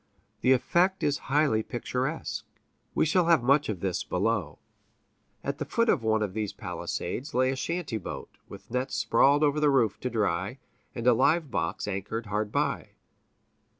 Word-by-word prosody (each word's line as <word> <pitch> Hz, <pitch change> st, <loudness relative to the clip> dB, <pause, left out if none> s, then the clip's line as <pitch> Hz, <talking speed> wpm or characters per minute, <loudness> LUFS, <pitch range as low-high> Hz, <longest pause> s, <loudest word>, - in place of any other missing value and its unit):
The 130 Hz, -, +4 dB
effect 180 Hz, +9 st, +2 dB
is 145 Hz, 0 st, +1 dB
highly 140 Hz, -6 st, +3 dB
picturesque. 130 Hz, +6 st, -3 dB, 0.5 s
We -, -, +3 dB
shall 170 Hz, +2 st, +2 dB
have 165 Hz, -7 st, +4 dB
much 140 Hz, +2 st, +3 dB
of 95 Hz, -5 st, -3 dB
this 95 Hz, -2 st, -1 dB
below. 95 Hz, -5 st, -1 dB, 0.9 s
At -, -, -3 dB
the -, -, -1 dB
foot 230 Hz, 0 st, +1 dB
of 135 Hz, -, +3 dB
one 110 Hz, -1 st, +1 dB
of 100 Hz, -3 st, -3 dB
these 105 Hz, -2 st, -3 dB
palisades 130 Hz, 0 st, -5 dB
lay 130 Hz, +1 st, +3 dB
a -, -, -2 dB
shanty 145 Hz, -4 st, -3 dB
boat, -, -, -7 dB, 0.2 s
with 100 Hz, +2 st, -12 dB
nets 125 Hz, +2 st, -1 dB
sprawled 145 Hz, +2 st, +4 dB
over 150 Hz, 0 st, +2 dB
the 150 Hz, -1 st, +4 dB
roof 120 Hz, -7 st, +2 dB
to 125 Hz, -, -2 dB
dry, 100 Hz, -1 st, -1 dB, 0.4 s
and 115 Hz, -, -4 dB
a 125 Hz, -, +7 dB
live 155 Hz, +5 st, +2 dB
box 100 Hz, +4 st, -2 dB
anchored 105 Hz, +4 st, -3 dB
hard 105 Hz, 0 st, -2 dB
by. -, -, -1 dB
125 Hz, 170 wpm, -28 LUFS, 105-145 Hz, 0.9 s, a